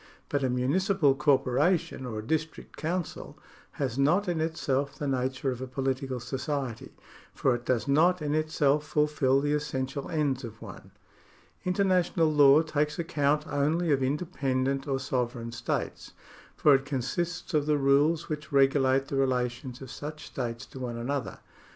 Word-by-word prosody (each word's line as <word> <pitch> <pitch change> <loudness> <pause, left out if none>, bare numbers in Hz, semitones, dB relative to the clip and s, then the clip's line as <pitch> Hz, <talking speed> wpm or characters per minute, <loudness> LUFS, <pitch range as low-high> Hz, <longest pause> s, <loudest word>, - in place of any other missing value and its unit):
But 145 -1 0
a 130 - +1
municipal 145 +5 +2
corporation 140 +1 +1
or 110 -3 -5
a 110 - -4
district 160 +4 -3
council 170 +1 -4 0.4
has 135 -2 -3
not 175 +9 +3
in 170 -3 0
itself 140 -4 -1
the 145 - -3
nature 130 0 -1
of 125 0 -6
a 130 - -4
political 130 0 -2
society, 130 0 -4 0.4
for 130 - +2
it 120 0 -4
docs 125 +1 +1
not 170 +6 +4
in 150 -1 -2
itself 150 -2 +2
fulfil 150 -3 +2
the 145 +1 0
essential 135 -2 -3
ends 145 -4 0
of 110 -2 -8
one. 95 -3 -11 0.8
International 180 -4 +2
law 145 +1 +7
takes 150 -1 -1
account 150 -3 0
only 155 +4 0
of 135 -2 +2
independent 135 -2 -1
or 135 -1 0
sovereign 125 -3 -2
states, 120 0 -4 0.4
for 150 - +5
it 135 0 +3
consists 150 +7 -3
of 150 -1 +1
the 150 -1 +3
rules 145 +4 +3
which 155 0 -5
regulate 135 -1 +3
the 135 - -3
relations 125 -1 -1
of 130 - -9
such 150 +1 -7
states 120 -2 -5
to 130 - -11
one 120 -2 -4
another. 130 +2 -3
140 Hz, 155 wpm, -28 LUFS, 130-155 Hz, 0.8 s, law